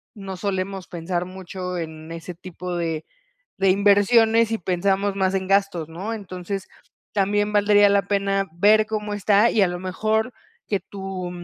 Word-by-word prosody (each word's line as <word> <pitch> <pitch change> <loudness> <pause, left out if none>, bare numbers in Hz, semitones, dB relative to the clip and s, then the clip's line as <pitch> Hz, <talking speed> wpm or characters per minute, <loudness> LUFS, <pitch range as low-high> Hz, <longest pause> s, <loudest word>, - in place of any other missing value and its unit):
no 195 -3 -7
solemos 190 -1 -3
pensar 175 +1 -3
mucho, 185 0 -6
en 160 -1 -7
ese 165 +2 -7
tipo 180 +1 -7
de 165 -2 -2 0.5
de 195 0 +3
inversiones, 220 +3 +4
y - - +1
pensamos 195 +2 0
más 190 -1 +1
en 190 -1 -2
gastos, 195 -5 +1
¿no? 190 +7 -5
Entonces, 195 -2 -6 0.5
también 205 +1 +1
valdría 205 0 +5
la 200 0 +3
pena, 195 -1 0
ver 210 +5 +4
cómo 210 -1 -3
está. 205 +2 +3
Y 215 - +2
a 195 - +5
lo 175 0 -4
mejor, 215 +6 -1 0.4
que 200 - 0
tu 190 -1 -6
195 Hz, 155 wpm, -23 LUFS, 180-205 Hz, 0.5 s, valdría